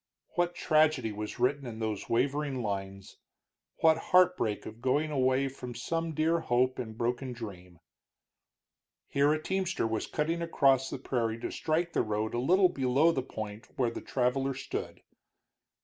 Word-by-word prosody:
What 175 0 0
tragedy 155 -8 +2
was 105 0 -5
written 130 +2 +1
in 115 -2 -6
those 110 -2 -3
wavering 135 +2 0
lines; 100 -1 -5 0.6
what 160 0 +5
heartbreak 180 - +3
of 110 +2 -9
going 145 +5 +1
away 130 -1 +2
from 125 -2 -8
some 165 +6 -2
dear 160 +2 +2
hope 130 -2 +1
and 110 -3 -6
broken 125 +2 -2
dream! 90 -7 -9 1.3
Here 140 +1 +3
a 155 - +1
teamster 190 -2 -1
was 110 -1 -2
cutting 165 +3 -1
across 135 -5 +3
the - - -4
prairie 115 -4 -1
to - - -3
strike 165 +2 -1
the - - +2
road 110 +1 -2
a 120 - 0
little 180 +8 +4
below 140 +1 +3
the 135 - -1
point 110 -3 -7
where 120 -3 +1
the - - -6
traveler 135 +1 0
stood. 130 - -5
130 Hz, 155 wpm, -30 LUFS, 115-155 Hz, 1.3 s, what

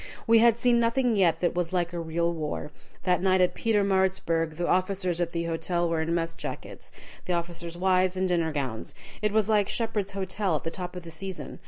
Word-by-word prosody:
We 230 -1 +6
had 235 0 +5
seen 235 0 +3
nothing 235 0 +2
yet 180 -5 +3
that 175 - +1
was 175 0 -2
like 175 -1 0
real 170 0 -1
war. 150 -2 -4 0.3
That 180 -2 +2
night 190 0 +3
at 180 -1 +3
Pietermaritzburg 190 -6 +1
the 175 - -1
officers 185 -2 0
at 170 - 0
the 170 0 -2
hotel 170 +1 -1
were 165 -1 0
in 165 +1 0
mess 165 -1 -1
jackets, - - -7 0.3
the 180 - -1
officers' 170 0 -3
wives 185 0 +2
in 190 - +1
dinner 170 -3 +1
gowns. 130 -7 -4 0.3
It 210 -1 +1
was 215 -1 +2
like 210 -3 +2
Shepheard's 210 -4 -1
Hotel, 190 -2 -1
at 150 - -3
the 165 - -3
top 180 0 -6
of 180 - -7
the 165 - -9
season. 160 -4 -7
180 Hz, 205 wpm, -27 LUFS, 170-195 Hz, 0.3 s, We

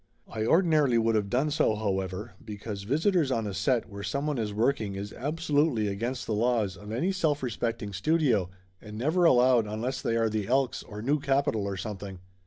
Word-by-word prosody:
I 110 0 -3
ordinarily 155 -7 +4
would 115 0 +2
of 105 -2 0
done 135 +7 +1
so, 145 -7 +2
however, 95 0 -3
because 105 -1 -6
visi 155 - +2
tors 170 -7 +2
on 115 -4 0
a 100 - -3
set 115 +5 +1
where 100 -2 -8
someone 140 +5 -2
is 105 -2 -2
working 110 -2 0
is 100 +1 -6
absolutely 145 -4 0
against 120 +6 -3
the 110 - -2
laws 110 -3 +1
of 105 +1 -10
any 140 - 0
self 155 -7 0
respecting 115 -3 -3
studio 115 - +1 0.3
and 105 0 -9
never 160 +9 +2
allowed 125 -5 +5
unless 110 +5 -3
they 115 - 0
are 115 -1 +2
the 110 -2 -2
Elks 130 +1 +1
or 105 0 -9
new 145 +4 +2
capital 135 -6 +1
or 100 -1 -3
something. 100 -2 -6
115 Hz, 195 wpm, -28 LUFS, 105-140 Hz, 0.3 s, allowed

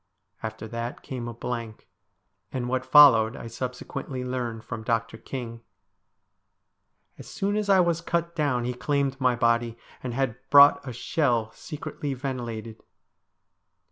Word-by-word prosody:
After 110 0 -6
that 115 +2 -5
came 125 -3 -5
a 120 - -5
blank, 115 -2 -5 0.6
and 125 -2 -3
what 130 0 -1
followed 125 -6 +7
I - - -8
subsequently 125 +2 -5
learned 120 -3 -3
from 115 -1 -6
Dr. 115 0 -1
King. 115 0 -7 1.6
As - - -10
soon 200 +1 -2
as 210 -1 -1
I 190 -2 +6
was 170 -2 +1
cut 170 0 -2
down 140 -6 +1
he 125 +1 -2
claimed 140 +1 -1
my 125 -1 +3
body, 115 -1 +1 0.2
and 125 -2 -4
had 130 -3 -1
brought 140 0 +8
a - - -3
shell, 120 -2 0
secretly 145 -2 -6
ventilated. 120 -4 -5
125 Hz, 140 wpm, -26 LUFS, 115-140 Hz, 1.6 s, brought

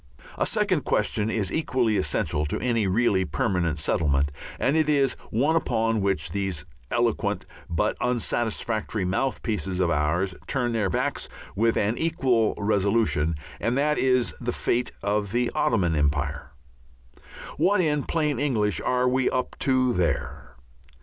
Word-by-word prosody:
A - - 0
second 205 -7 +1
question 105 0 +1
is 110 -4 -1
equally 125 -8 +1
essential 85 -5 0
to - - -2
any 115 -5 +1
really 100 -1 +2
permanent 85 +1 -1
settlement, 70 -2 +1 0.3
and 140 - +2
it 155 -1 +2
is 140 -3 +3 0.2
one 140 +9 +1
upon 115 -7 +1
which 100 0 0
these 95 -2 -2 0.2
eloquent 120 -2 0 0.2
but 105 +6 0
unsatisfactory 115 -3 -1
mouthpieces 95 -2 -1
of 90 -2 +2
ours 85 +5 +1
turn 125 -3 0
their 110 -4 0
backs - - -2 0.3
with 115 +2 +2
an 105 +3 0
equal 130 -9 +1
resolution, 100 -6 +1 0.2
and 120 +2 0
that 150 +2 +1
is 125 -2 +2
the 120 0 -1
fate 120 +1 0
of 100 0 0
the 120 +1 0
Ottoman 90 -8 +1
Empire. 75 -1 -1 1.1
What 205 +1 +3
in 150 -4 +2
plain 150 -4 -1
English 110 -8 +1
are 125 0 +1
we 130 0 +2
up 130 -1 -2
to 130 -2 +2
there? 90 -4 -2
115 Hz, 140 wpm, -25 LUFS, 95-125 Hz, 1.1 s, is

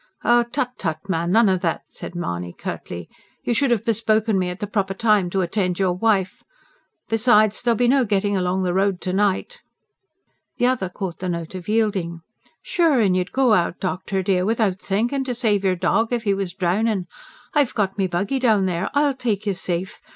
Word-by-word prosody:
"Tut, 240 +2 +2
tut, 160 -4 -1
man, 170 -1 0
none 225 +2 +5
of 185 -2 +1
that!" 165 - -1
said - - -10
Mahony 90 - -4
curtly. 85 -1 -6 0.4
"You 240 - 0
should 275 +3 +2
have 235 -4 +1
bespoken 220 -2 +1
me 180 -1 0
at 180 +1 -6
the - - -2
proper 195 -2 -2
time 210 -3 +2
to 190 +2 0
attend 180 0 -1
your 190 -2 +1
wife. 190 -1 0 0.7
Besides, 215 -2 +3
there'll 240 -1 +2
be 245 +2 +2
no 265 +1 +4
getting 205 -2 0
along 185 0 0
the 180 -1 0
road 195 -1 +1
to 185 - -2
night." 205 - 0 1.0
The 245 - +2
other 245 -7 +1
caught 180 -2 -6
the 185 - -3
note 170 -1 -4
of 185 +1 -7
yielding. 200 -7 0 0.4
"Sure 330 -7 +2
an' 200 -5 +3
you'd 180 -1 -1
go 260 -4 +3
out, 175 -3 +1
doctor 190 +1 -2
dear, 185 -1 +1
without 210 -2 +1
thinkin', 235 +9 -1
to 250 -2 -2
save 215 -5 +1
your 190 -1 +2
dog 225 +6 +1
if 240 -2 -1
he 200 -3 +2
was 195 -3 -3
drownin'. 190 +2 0 0.5
I've 290 -4 +2
got 200 -2 -1
me 190 - +2
buggy 195 +9 -1
down 220 -6 +3
there; 180 0 -1
I'll 285 -1 +3
take 225 -6 -2
you 200 - +1
safe. 185 0 -4
200 Hz, 195 wpm, -22 LUFS, 185-230 Hz, 1.0 s, none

